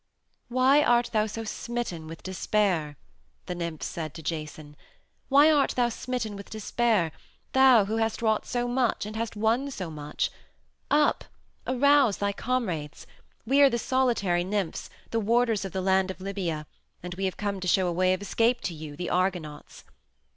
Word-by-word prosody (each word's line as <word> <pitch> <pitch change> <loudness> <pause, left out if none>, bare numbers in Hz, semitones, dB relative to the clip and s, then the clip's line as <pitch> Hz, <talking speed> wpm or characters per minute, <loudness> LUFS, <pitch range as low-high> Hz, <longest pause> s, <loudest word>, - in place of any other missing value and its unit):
"Why 260 +4 +4
art 240 -4 +3
thou 215 0 +2
so 225 +2 -5
smitten 220 -7 -4
with 165 0 -10
despair?" 185 -5 0 0.5
the - - -4
nymphs 170 -3 -4
said 155 -3 -5
to 160 - -9
Jason. 155 -1 -5 0.5
"Why 285 +3 +6
art 290 -3 +3
thou 245 -1 +2
smitten 235 -3 -4
with 200 0 -10
despair, 215 -5 0 0.4
thou 260 -5 +6
who 220 +3 -2
hast 225 -1 0
wrought 220 -1 +1
so 245 0 -1
much 245 -3 0
and 215 +1 -7
hast 230 0 -3
won 225 +6 +1
so 185 -11 -6
much? 150 -1 -3 0.6
Up! 295 0 +2 0.4
Arouse 275 -3 +4
thy 200 0 -1
comrades! 190 - -3 0.4
We 275 +5 +4
are 280 - +8
the 235 - -1
solitary 230 -8 +1
nymphs, 195 -2 -3 0.2
the 230 - +1
warders 225 -1 +1
of 190 - -5
the 190 - -2
land 190 0 +2
of 190 - -6
Libya, 185 -6 -3 0.4
and 180 0 -5
we 190 +2 -3
have 190 - -2
come 205 -2 -2
to 185 - -4
show 185 +1 +3
a 175 - 0
way 185 +1 +2
of 185 +2 -3
escape 235 +4 +1
to 175 - -3
you, 155 -2 -8
the 175 +4 -4
Argonauts. 175 -5 -2
205 Hz, 175 wpm, -27 LUFS, 175-240 Hz, 0.6 s, are